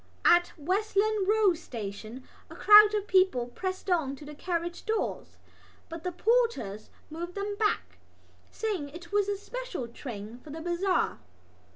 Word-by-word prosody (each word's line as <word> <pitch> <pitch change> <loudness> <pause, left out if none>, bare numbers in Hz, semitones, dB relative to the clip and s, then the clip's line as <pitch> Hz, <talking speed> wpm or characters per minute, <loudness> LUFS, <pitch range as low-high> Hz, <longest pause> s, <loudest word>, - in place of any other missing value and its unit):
At 350 0 +5
Westland 400 +4 0
Row 425 -3 +4
Station 230 - -8 0.2
a - - -11
crowd 425 0 +8
of 415 -1 -1
people 370 -12 +3
pressed 370 +10 -5
to 320 -8 0
the 300 - -9
carriage 345 +2 -3
doors; 440 0 -3 0.5
but 330 -1 -7
the 360 - -2
porters 380 - 0 0.2
moved 345 +3 -6
them 405 0 -3
back, 420 -1 -1 0.5
saying 405 -10 -3
that 285 - -14
it 340 0 -11
was 410 -1 +2
a 405 - -1
special 410 - -6
train 230 -2 -8
for 295 - -15
the 310 +3 -7
bazaar. 350 +3 0
360 Hz, 150 wpm, -29 LUFS, 290-410 Hz, 0.5 s, crowd